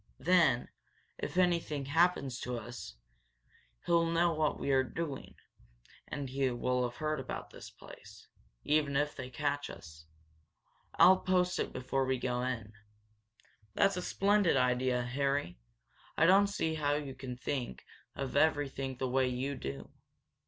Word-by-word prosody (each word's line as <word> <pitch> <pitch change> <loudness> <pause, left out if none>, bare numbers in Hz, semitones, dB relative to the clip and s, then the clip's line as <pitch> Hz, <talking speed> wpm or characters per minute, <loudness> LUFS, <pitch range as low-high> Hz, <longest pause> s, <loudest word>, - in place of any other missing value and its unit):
Then, 160 -8 +3 0.5
if - - -4
anything 170 -6 +1
happens 145 -4 +2
to 125 -1 -3
us, 120 - -8 0.9
he'll 170 -1 +3
know 170 +1 +2
what 155 -1 0
we 140 - -1
were 130 -1 +4
doing, 145 +1 -5 0.7
and 145 -1 -4
he 135 0 0
will 125 +1 0
have 120 - -15
heard 155 -1 -1
about 130 - -6
this - - -10
place, - - -14 0.4
even 145 -2 +2
if 150 +1 0
they 130 -2 -6
catch 145 +2 -2
us. 80 0 -12 0.9
I'll 185 +3 +7
post 180 -1 +1
it - - -1
before 135 +1 -1
we 130 0 0
go 125 0 -2
in." 115 -4 -3 1.0
"That's 195 -1 +3
a 180 - -2
splendid 200 -3 +2
idea, 125 0 +2
Harry. 135 - -1 0.6
I 160 - +5
don't 195 +3 +6
see 165 -5 -1
how 145 -2 0
you 145 -2 -4
think 125 - -5 0.3
of 135 -2 -4
everything 135 -4 +1
the 130 - -1
way 130 +1 +2
you 130 +3 -2
do." 70 - -6
140 Hz, 145 wpm, -32 LUFS, 125-160 Hz, 1.0 s, I'll